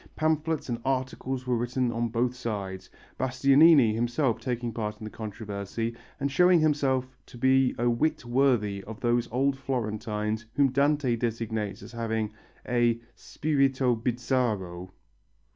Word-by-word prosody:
Pamphlets 155 0 0
and 120 -2 -3
articles 130 0 -2
were 125 -1 +1
written 120 +1 0
on 115 0 -1
both 120 +2 0
sides, 100 -6 -5 0.3
Bastianini 135 0 +5
himself 120 +2 0
taking 120 -2 -3
part 105 -2 -3
in 110 - -11
the 110 - -6
controversy 110 +1 -5 0.2
and 140 0 -1
showing 180 +4 +5
himself 135 -4 +1
to - - -12
be 130 +1 +3
a 120 - +1
wit 120 +4 0
worthy 120 -6 +1
of 110 0 -8
those 120 0 +1
old 135 +3 +1
Florentines 110 -4 -3
whom 140 -1 +3
Dante 140 -2 +2
designates 110 -3 -3
as 110 - -10
having 110 -2 -2 0.3
a 120 -1 +2
"spirito 135 -4 +1
bizzarro." 110 -7 -1
120 Hz, 135 wpm, -27 LUFS, 110-135 Hz, 0.3 s, Bastianini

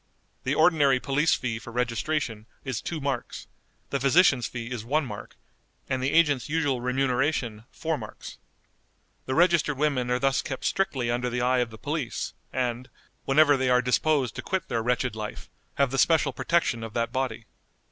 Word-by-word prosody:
The - - +1
ordinary 145 -6 +4
police 145 +5 +2
fee 115 -3 -3
for 120 - -10
registration 120 -1 -2 0.2
is 130 -5 -3
two 165 - -4
marks, 135 -4 -3 0.5
the 140 - 0
physician's 135 -3 +4
fee 120 0 -6
is 120 -4 -4
one 145 +6 0
mark, - - -8 0.5
and 130 0 -1
the 135 +2 0
agent's 145 -7 +3
usual 145 -5 0
remuneration 125 -3 0
four 160 -2 -3
marks. 110 -2 -9 0.9
The 130 - -1
registered 170 -4 +3
women 135 -4 0
are 125 - +2
thus 135 +1 +1
kept 130 - -5
strictly 135 -12 0
under 120 +1 -1
the 125 0 -2
eye 125 +1 +2
of 120 -1 0
the 110 - -11
police, 145 -1 -3 0.2
and, 125 -1 -2 0.4
whenever 145 +1 +5
they 130 -1 +1
are 125 0 +5
disposed 130 0 +1
to - - -3
quit 190 -1 -3
their 115 - 0
wretched 120 0 0
life, 105 -1 -7 0.2
have 140 -2 +2
the 135 - -1
special 155 -5 +3
protection 125 -4 0
of 115 -1 -7
that 115 0 0
body. 125 -4 -2
130 Hz, 175 wpm, -26 LUFS, 120-145 Hz, 0.9 s, whenever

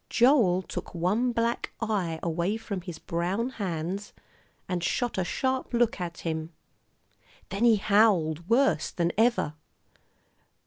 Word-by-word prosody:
Joel 235 -8 +4
took - - -7
one 205 +9 +1
black 230 0 -1
eye 195 -8 -1
away 170 +5 0
from 200 -4 -5
his 175 -2 -7
brown 180 +9 -2
hands, 185 +2 -3 0.5
and 180 -2 -2
shot 240 +3 0
a - - +2
sharp 260 +6 -1
look 235 -5 +2
at 170 -1 -5
him. 160 0 -3 1.0
Then 200 +5 0
he 230 -2 +6
howled 195 -6 +2
worse 265 +4 +3
than 170 -1 0
ever. 225 -8 +2
195 Hz, 130 wpm, -27 LUFS, 170-230 Hz, 1.0 s, he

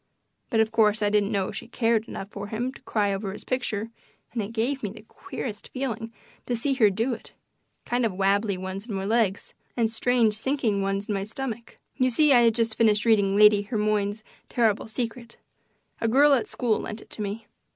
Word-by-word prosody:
But, 225 - +1
of 220 0 +1
course, 215 -1 +3
I 205 - +2
didn't 210 0 +2
know 195 -3 0
she - - -7
cared 230 -1 +1
enough 195 - -7
for 200 0 -6
him 240 +5 -3
to - - -14
cry 205 -2 0
over 195 0 -3
his 205 - -9
picture, 230 -4 -2 0.4
and 235 - -1
it 205 +1 -5
gave 245 +5 -1
me 210 - -2
the 210 +2 -12
queerest 215 -1 -7
feelings 240 -4 -4 0.4
to 245 - 0
see 270 +4 0
her 230 -6 +5
do 225 +6 -1
it - - -10 0.5
kind 245 +1 0
of 225 - +1
wabbly 200 +1 +1
ones 190 +3 -6
in 210 - -4
my 190 0 -3
legs, 215 -2 0 0.2
and 225 -2 +2
strange, 230 -1 +2
sinking 220 -3 0
ones 195 +1 -1
in 210 - -1
my 195 -1 -1
stomach. 235 +1 -6 0.2
You 255 0 +3
see, 295 +3 +5
I 245 - +7
had 230 -2 +4
just 230 -2 +1
finished 215 -2 +3
reading 205 -4 +3
Lady 210 0 +7
Hermione's 210 -1 -1 0.3
Terrible 225 -4 +1
Secret. 235 0 -5 0.6
A 230 - 0
girl 280 +5 +5
at 250 -5 +1
school 230 -4 0
lent 215 +1 -6
it - - -18
to - - -7
me. 210 +2 -4
220 Hz, 205 wpm, -26 LUFS, 205-235 Hz, 0.6 s, I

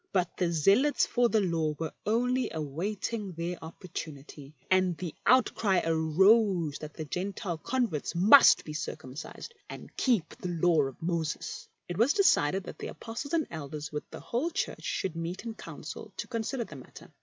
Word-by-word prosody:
But 180 -3 0
the 175 -2 +1
zealots 195 - +4
for 245 -1 +2
the 220 -2 +3
Law 165 -5 0
were 160 0 -4
only 250 +3 +1
awaiting 185 +7 -3
their 170 +1 -4
opportunity, 155 -4 -8 0.2
and 185 -2 +3
the 175 -4 -5
outcry 225 -6 +4
arose 165 +1 +3
that 155 0 -8
the 155 - -5
Gentile 180 +1 -3
converts 225 - -1
must 210 +11 +7
be 150 - -6
circumcised 150 - -6 0.2
and - - -10
keep 225 - +1
the 180 - -5
Law 170 -2 +3
of 135 - -10
Moses. 165 -3 -3 0.2
It 175 +1 -5
was 250 +7 +5
decided 195 - +3
that - - -9
the - - -4
Apostles 235 +6 -6
and 315 -3 +1
Elders 150 -1 -6
with 150 -1 -5
the - - -8
whole 255 +8 -1
Church 345 - -3
should 185 -4 -2
meet 170 +6 -4
in 230 - -4
council - - -8
to - - -3
consider 235 +1 -2
the 155 -10 -10
matter. 130 - -13
180 Hz, 165 wpm, -29 LUFS, 160-225 Hz, 0.2 s, must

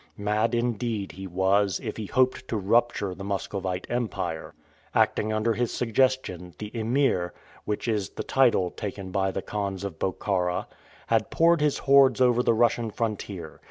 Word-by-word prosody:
Mad 105 +3 +1
indeed 115 -4 -1
he 95 +3 -8
was, 95 +1 +2
if - - -5
he 110 -2 -5
hoped 130 +1 +1
to 115 - -1
rupture 105 -1 +1
the 100 - -9
Muscovite 95 -2 -3
Empire. 100 -9 -3 0.4
Acting 110 - +2
under 110 +1 +1
his 120 +1 -1
suggestion, 115 -7 0
the 105 0 -7
Emir 115 -6 +1 0.3
which 105 +2 -3
is 105 -4 0
the - - -6
title 120 -9 +3
taken 100 -2 -6
by 95 0 +1
the 95 0 -4
khans 100 -2 -3
of 95 -5 -5
Bokhara 90 -1 -1 0.4
had 110 -1 +1
poured 165 -1 +3
his 150 -2 +2
hordes 135 -3 +5
over 125 -1 +4
the 115 - +2
Russian 120 0 +2
frontier. 100 -7 -4
105 Hz, 160 wpm, -26 LUFS, 95-120 Hz, 0.4 s, hordes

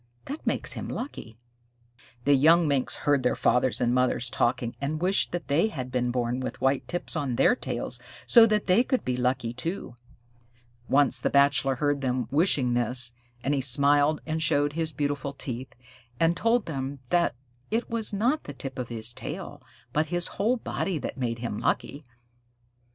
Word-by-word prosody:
"That 290 +3 -7
makes - - 0
him - - -5
lucky." 115 - -6 0.9
The 145 - +5
young 160 +4 +5
Minks 140 -3 0
heard 145 -2 +3
their 125 - +1
fathers 125 0 +2
and 120 -1 +1
mothers 125 -1 +1
talking, 120 -2 0
and 150 +2 -2
wished 185 +4 +1
that 175 -1 -4
they 155 +9 +3
had 130 - -6
been 125 -1 0
born 120 0 -1
with 130 - -5
white 135 0 +1
tips 175 0 -3
on 140 -6 -1
their 245 - +4
tails - - -4 0.3
so 230 -2 +7
that 215 -1 +1
they 195 +6 +4
could 260 0 -1
be 125 - 0
lucky 125 -1 -1
too. 135 +1 -4 1.0
Once 135 -3 +4
the - - 0
Bachelor 140 -1 +3
heard 145 +1 0
them 125 -3 -1
wishing 145 -5 +3
this, 120 0 0 0.3
and 140 - +1
he 140 - +1
smiled 145 +3 +3
and 160 0 -2
showed 145 -1 +2
his 160 0 -1
beautiful 145 -1 -2
teeth, 130 -2 -7 0.4
and 165 +1 +3
told 230 +4 +2
them 135 -2 -4
that 170 -8 +2 0.3
it 225 +3 -1
was 230 -2 -2
not 240 +9 0
the 145 - -7
tip 135 -1 -7
of 125 - -4
his 115 0 0
tail - - -7 0.3
but 155 +2 +1
his 175 0 -1 0.2
whole 235 +5 +2
body 190 -5 -2
that 140 - -5
made 115 -2 -1
him 115 -3 -4
lucky. 145 +2 -1
140 Hz, 180 wpm, -27 LUFS, 125-165 Hz, 1.0 s, so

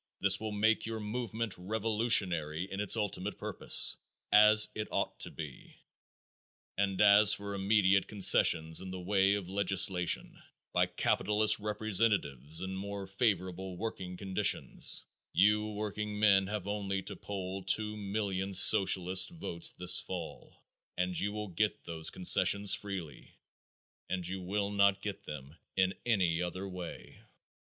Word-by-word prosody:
This 95 0 +1
will 110 0 -5
make 110 +2 +1
your 115 -1 -5
movement 110 0 -4
revolutionary 95 -6 0
in 95 - -5
its 105 +2 0
ultimate 105 -1 -4
purpose, - - +1 0.3
as 105 +1 +7
it 105 0 -5
ought - - -3
to - - -5
be, 75 -4 -10 1.0
and 95 -1 -1
as 105 0 +6
for 100 0 -7
immediate 100 -1 +2
concessions 80 -5 +4
in 95 - -8
the 95 0 -7
way 95 +2 +1
of 100 -3 -5
legislation 95 -2 +1 0.3
by - - +2
capitalist 105 +1 +2
representatives 105 - 0
and 95 0 -5
more 100 0 -6
favorable 95 -3 -2
working 95 -4 -6
conditions, 95 -1 0 0.3
you 105 +2 +3
workingmen 105 -1 0
have 105 -2 -5
only 100 -2 -3
to - - -7
poll 95 -1 -6
two 105 +3 -2
million 100 -2 -4
Socialist 95 -1 +4
votes 165 - -3
this 90 0 +3
fall, 90 -3 -9 0.3
and 90 0 -2
you 100 - 0
will 105 -1 -6
get 105 +4 -2
those 80 -1 -5
concessions 100 +2 +5
freely 95 -8 -6 0.7
and 90 -2 -3
you 95 +1 -5
will 100 +2 -3
not 100 -1 +2
get 105 -2 -6
them 75 +1 -9 0.2
in 95 0 +2
any 90 -7 +1
other 95 +2 -5
way. 90 -2 -10
100 Hz, 135 wpm, -31 LUFS, 90-105 Hz, 1.0 s, as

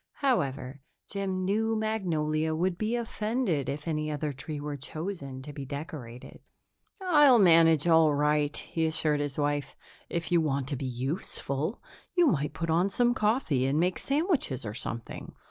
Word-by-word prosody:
However, 140 - -1 0.3
Jim 190 -2 -2
knew 220 +3 +1
Magnolia 160 -8 0
would 175 +2 0
be 215 +6 -1
offended 220 - -1
if 150 +3 -5
any 155 -1 -1
other 150 -1 -2
tree 145 +3 -6
were 145 0 -4
chosen 140 -2 -6
to 145 - -8
be 140 - -6
decorated. 135 -4 -8 0.6
"I'll 295 -8 +6
manage 165 -5 +6
all 160 -2 +6
right," 150 0 +1
he 165 -1 -2
assured 155 -2 +1
his 145 -1 -3
wife. 145 -1 -1 0.3
"If 170 0 -3
you 170 -1 +4
want 140 -4 -1
to 145 - -1
be 135 0 -4
useful, 140 - -3 0.3
you 355 -1 +5
might 150 - +1
put 165 +1 -2
on 175 +4 +3
some 240 +4 +2
coffee 210 - +1
and 140 +3 +1
make 180 +2 +1
sandwiches 285 - 0
or 105 - -4
something. 115 -1 -6
160 Hz, 160 wpm, -29 LUFS, 145-200 Hz, 0.6 s, I'll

